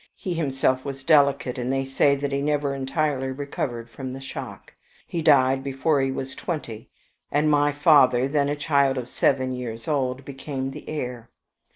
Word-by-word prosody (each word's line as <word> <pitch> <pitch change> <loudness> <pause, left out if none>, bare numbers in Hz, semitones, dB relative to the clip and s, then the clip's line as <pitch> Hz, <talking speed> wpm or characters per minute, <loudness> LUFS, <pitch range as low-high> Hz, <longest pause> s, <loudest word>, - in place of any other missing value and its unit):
He 185 - -4
himself 135 -5 0
was 135 -1 -6
delicate, 140 -3 +3
and 125 +1 -2
they 135 0 0
say 135 +1 +3
that 140 0 -3
he 140 0 0
never 145 -1 0
entirely 135 0 -1
recovered 130 -4 -4
from 130 +2 -7
the 135 - -7
shock. 135 - -8 0.3
He 170 - -3
died 135 -3 +4
before 140 +2 +1
he 135 - +1
was 135 0 -5
twenty, 115 -10 -5 0.4
and 150 +1 +2
my 145 0 +3
father, 140 -4 +5
then 145 0 +1
a 145 - 0
child 140 -2 +2
of 125 -1 -5
seven 130 -1 +1
years 115 -2 -6
old, 135 -3 -1
became 135 -1 -5
the - - -9
heir. 125 -6 -5
135 Hz, 175 wpm, -24 LUFS, 130-145 Hz, 0.4 s, father